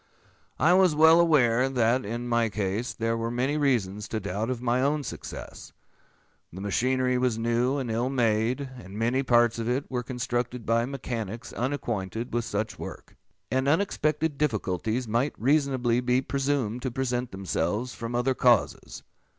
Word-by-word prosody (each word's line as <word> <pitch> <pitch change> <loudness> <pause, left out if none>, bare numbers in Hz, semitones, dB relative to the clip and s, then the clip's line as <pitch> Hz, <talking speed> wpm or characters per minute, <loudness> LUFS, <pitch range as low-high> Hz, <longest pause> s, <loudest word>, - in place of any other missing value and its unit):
I 170 +3 +4
was 185 -4 +4
well 160 +2 +7
aware 130 -7 +4
that, 125 0 +2
in 120 +3 -4
my 120 -1 +2
case, 105 +3 -2
there 115 0 -1
were 115 0 -2
many 125 +5 0
reasons 110 -8 0
to 110 - -3
doubt 105 +3 -3
of 130 -2 -2
my 125 +1 +1
own 145 +2 +1
success. - - -8 0.8
The 95 - -9
machinery 125 +5 +1
was 125 -3 +1
new, 120 +4 +1
and 130 -4 -3
ill 120 +3 0
made; 120 0 +1 0.2
and 95 +3 -10
many 120 +4 +1
parts 120 -3 +3
of 115 +1 -2
it 130 +3 0
were 125 -1 -1
constructed 125 -1 -3
by 115 +1 +2
mechanics 120 -4 -5
unacquainted 120 -4 -3
with 120 -1 0
such 105 0 -3
work; - - -9 0.4
and 130 +1 +1
unexpected 155 -3 +1
difficulties 110 - -1
might 120 +6 0
reasonably 130 -3 +2
be 125 0 +2
presumed 135 -4 -1
to 130 - -2
present 125 -1 -2
themselves 95 +5 -2
from 115 +1 -5
other 125 +2 +1
causes. 120 -3 +1
120 Hz, 160 wpm, -27 LUFS, 115-130 Hz, 0.8 s, well